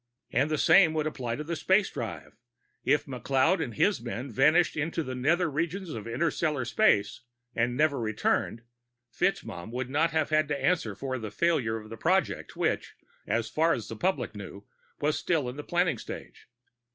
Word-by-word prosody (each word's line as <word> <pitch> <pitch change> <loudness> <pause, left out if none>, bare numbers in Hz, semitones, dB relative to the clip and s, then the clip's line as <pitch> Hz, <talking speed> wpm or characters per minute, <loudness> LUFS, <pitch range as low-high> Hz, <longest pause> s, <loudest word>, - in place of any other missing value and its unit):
And 135 +6 +2
the 155 - 0
same 160 +1 +5
would 155 -1 0
apply 125 -6 -3
to 150 - -5
the 170 +2 -3
space 190 +5 +2
drive; - - -6 0.5
if - - +2
McLeod 135 +6 +1
and 120 -7 -6
his 200 - +2
men 120 +2 -5
vanished 155 +9 +4
into 160 +2 -1
the 130 - -5
nether 155 +8 +2
regions 170 +5 -2
of 110 -4 -6
interstellar 150 +1 0
space 120 - +2 0.3
and 120 +1 0
never 150 -2 +2
returned, 110 +1 -1 0.5
FitzMaugham 85 +4 -2
would 125 +2 -4
not 155 +4 +2
have 155 -1 0
had 155 0 +3
to 145 -1 -2
answer 135 - +1
for 130 +3 -4
the 110 -2 -5
failure 120 -2 +1
of 110 0 -11
a 115 - -7
project 185 +7 0
which, - - -1 0.3
as 115 +2 0
far 160 +7 +2
as 110 -2 -4
the 115 - -5
public 135 - -1
knew, 100 -1 -9 0.4
was 150 +1 0
still 160 -7 0
in 125 - -5
the 150 - -6
planning 175 - +1
stage. - - -9
140 Hz, 180 wpm, -28 LUFS, 115-165 Hz, 0.5 s, same